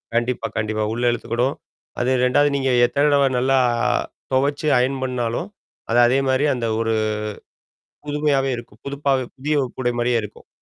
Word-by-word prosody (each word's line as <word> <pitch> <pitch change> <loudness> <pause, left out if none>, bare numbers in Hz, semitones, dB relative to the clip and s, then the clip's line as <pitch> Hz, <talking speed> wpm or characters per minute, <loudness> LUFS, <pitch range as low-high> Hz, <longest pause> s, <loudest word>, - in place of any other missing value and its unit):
கண்டிப்பா 120 -1 0
கண்டிப்பா. 110 0 -1
உள்ள 120 +1 -3
இழுத்துக்கிடும். 120 +3 -1 0.4
அது 125 +2 +1
2வது 145 +3 +3
நீங்க 135 -1 0 0.2
எத்தடவ 140 +2 +3
நல்லா 135 +2 +2 0.8
தொவச்சு 140 +4 +1
அயர்ன் 130 +2 0
பண்ணாலும். 125 +4 -2 0.4
அது 120 +1 +3
அதே 130 +3 +2
மாரி 130 +3 +2
அந்த 120 -2 -2
ஒரு 115 0 0 1.1
புதுமையாவே 145 -2 +1
இருக்கும். 115 -2 -12
புதுப்பாவே 140 -2 0
புதிய 150 +3 -1 0.2
உடை 120 -1 0
மாரியே 120 0 +2
இருக்கும். 105 - -11
130 Hz, 135 wpm, -21 LUFS, 120-140 Hz, 1.1 s, 2வது